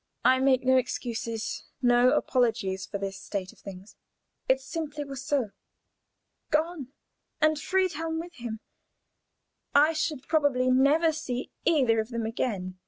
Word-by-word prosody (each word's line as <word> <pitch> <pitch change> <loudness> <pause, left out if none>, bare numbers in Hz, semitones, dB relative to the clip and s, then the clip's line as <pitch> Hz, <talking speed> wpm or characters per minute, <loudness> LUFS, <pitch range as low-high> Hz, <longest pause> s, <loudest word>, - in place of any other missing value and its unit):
I 260 0 +5
make 265 -1 +3
no 260 0 +4
excuses, 230 -3 -3 0.2
no 245 0 +4
apologies 220 -6 0
for 200 - -4
this 195 -1 -5
state 190 -2 -5
of - - -23
things. 195 +1 -11 0.5
It 260 0 +4
simply 295 +2 -5
was 275 -1 -7
so. 270 -8 0 1.0
Gone! 310 -2 0 0.5
And 310 0 +3
Friedhelm 330 -2 0
with 345 +1 -7
him! 230 -2 -6 1.1
I 300 +3 +6
should 310 -3 -2
probably 280 -5 +2
never 290 +6 +4
see 260 -5 -4 0.2
either 255 -9 +4
of 220 +1 -2
them 230 -2 -3
again. 195 -5 -3
260 Hz, 135 wpm, -27 LUFS, 225-305 Hz, 1.1 s, I